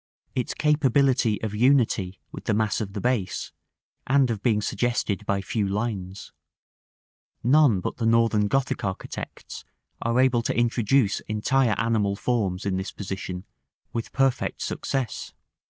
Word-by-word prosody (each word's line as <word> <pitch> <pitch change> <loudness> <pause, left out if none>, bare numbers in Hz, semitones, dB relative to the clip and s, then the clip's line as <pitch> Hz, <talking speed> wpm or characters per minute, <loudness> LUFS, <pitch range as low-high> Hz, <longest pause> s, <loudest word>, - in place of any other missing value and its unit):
its 125 - -2
capability 135 -6 +2
of 110 -2 -2
unity 110 -6 +2
with - - -9
the 110 - +1
mass 110 0 +1
of 100 -2 -5
the 100 - -3
base, 105 -5 -1 0.6
and 135 -2 +3
of 105 -3 -3
being 110 -2 +2
suggested 110 -2 -1
by 100 -1 +1
few 100 +2 -1
lines; 100 -2 -3 1.1
none 130 -4 +5
but - - -4
the 115 - -1
Northern 115 -2 +3
Gothic 130 +3 0
architects 95 -1 -6 0.4
are 115 +2 +1
able 130 -2 +4
to 115 - -2
introduce 120 -1 +2
entire 110 +2 +2
animal 110 -4 +1
forms 100 -5 -1
in 95 -2 0
this 95 +1 -4
position 95 -2 -5 0.5
with 115 - -4
perfect 135 -2 0
success. 130 -6 -3
115 Hz, 135 wpm, -25 LUFS, 100-125 Hz, 1.1 s, none